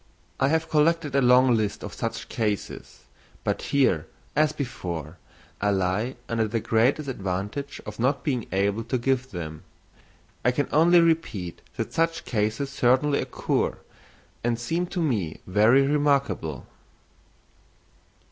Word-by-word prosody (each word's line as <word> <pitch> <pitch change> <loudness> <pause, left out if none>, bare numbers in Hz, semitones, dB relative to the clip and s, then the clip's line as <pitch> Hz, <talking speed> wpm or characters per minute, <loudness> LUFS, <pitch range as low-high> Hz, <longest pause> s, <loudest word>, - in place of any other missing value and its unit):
I 135 - +3
have 160 +2 +1
collected 155 -1 +2
a 140 - +4
long 125 0 +5
list 105 -2 -1
of - - -6
such - - -4
cases; 105 -3 -3 0.4
but - - -1
here, 125 - +2 0.3
as 155 0 +3
before, 90 - -5 0.4
I 105 - +2
lie 100 +6 0
under 115 -1 0
the 115 +2 -1
great 115 +4 +3
disadvantage 110 -1 -4
of 105 +1 -8
not 135 +3 +1
being 125 -6 -1
able 100 +4 +1
to 130 +2 0
give 130 +1 0
them. 80 -6 -6 0.8
I 125 - +4
can 145 +2 0
only 170 +3 +6
repeat 160 - 0 0.2
that - - -3
such 165 0 0
cases 110 +5 -1
certainly 135 +3 +2
occur, - - -1 0.7
and 120 -1 0
seem 165 +9 -1
to 180 - -4
me 105 - -1
very 110 +8 +4
remarkable. 140 - 0
125 Hz, 135 wpm, -25 LUFS, 105-145 Hz, 0.8 s, only